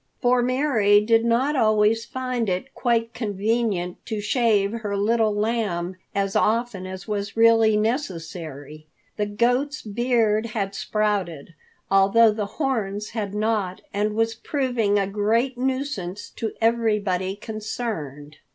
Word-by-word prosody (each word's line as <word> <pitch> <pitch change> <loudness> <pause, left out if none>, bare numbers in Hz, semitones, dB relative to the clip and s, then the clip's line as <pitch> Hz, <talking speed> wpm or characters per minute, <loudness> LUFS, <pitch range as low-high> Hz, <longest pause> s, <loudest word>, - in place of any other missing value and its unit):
For 245 0 +3
Mary 245 -5 +3
did 225 +1 +3
not 245 +6 +2
always 215 -1 +3
find 255 -4 -2
it 185 +9 -3
quite 230 -2 0
convenient 210 -4 -1
to 220 -2 -3
shave 210 -2 +2
her 205 -2 -3
Little 220 +2 +2
Lamb 205 -5 -1 0.2
as 195 -1 -1
often 220 -4 0
as 190 +2 -8
was 205 0 -3
really 225 -1 +5
necessary. 165 - -4 0.3
The 210 -1 0
goat's 245 +8 0
beard 225 0 +1
had 200 -4 -3
sprouted, 195 -7 -2 0.4
although 200 +4 +5
the 210 -1 -3
horns 210 -8 -1
had 210 -3 -4
not, 210 -4 -1
and 210 +1 0
was 225 0 +1
proving 235 -4 0
a 200 - +2
great 220 +6 0
nuisance 255 -7 -3
to 225 - -4
everybody 210 -5 +1
concerned. 205 - -6
215 Hz, 125 wpm, -23 LUFS, 200-235 Hz, 0.4 s, really